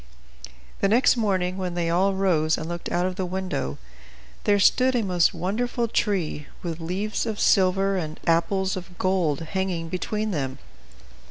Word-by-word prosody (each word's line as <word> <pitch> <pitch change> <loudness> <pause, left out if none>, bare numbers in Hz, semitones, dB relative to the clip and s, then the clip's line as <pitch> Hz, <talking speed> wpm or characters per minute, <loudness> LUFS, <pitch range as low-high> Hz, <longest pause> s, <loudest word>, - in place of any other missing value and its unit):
The - - +3
next 235 +7 +4
morning, 190 -5 0
when 180 -2 -3
they 170 -1 0
all 190 +3 +2
rose 165 -5 +2
and 160 - -5
looked 175 0 -5
out 175 +1 +1
of 185 0 -3
the 190 - -1
window, 175 - -3 0.7
there 205 - +4
stood 255 +6 +4
a 235 - +1
most 180 -4 +3
wonderful 230 +7 -1
tree, 185 -9 -1 0.2
with 170 -2 -4
leaves 195 +8 -2
of 215 -2 -3
silver 195 +1 +3
and 155 -3 -4
apples 190 +3 +1
of 180 -1 -9
gold 180 -6 +1
hanging 175 -1 -2
between 210 +4 -2
them. 135 -6 -2
185 Hz, 160 wpm, -25 LUFS, 170-195 Hz, 0.7 s, next